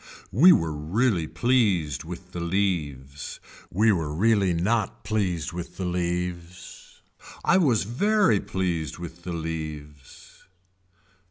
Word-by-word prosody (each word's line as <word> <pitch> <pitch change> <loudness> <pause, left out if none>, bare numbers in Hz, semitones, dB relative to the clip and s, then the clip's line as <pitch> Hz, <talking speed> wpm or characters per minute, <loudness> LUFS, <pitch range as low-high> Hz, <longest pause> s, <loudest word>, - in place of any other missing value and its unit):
We 160 - +7
were 80 - +2
really 85 +4 0
pleased 100 - +1
with 90 +1 -9
the 90 - -5
leaves. 80 -7 -2 0.3
We 110 +5 +3
were 80 -6 -1
really 100 +3 +2
not 95 +6 0
pleased 90 -6 -1
with 85 -1 -7
the 95 - -3
leaves. 90 0 -4 0.4
I 185 - +5
was 125 - +3
very 135 - +2
pleased 85 -6 -2
with 85 0 -9
the 90 0 -5
leaves. 75 -4 -7
90 Hz, 115 wpm, -25 LUFS, 80-105 Hz, 0.4 s, We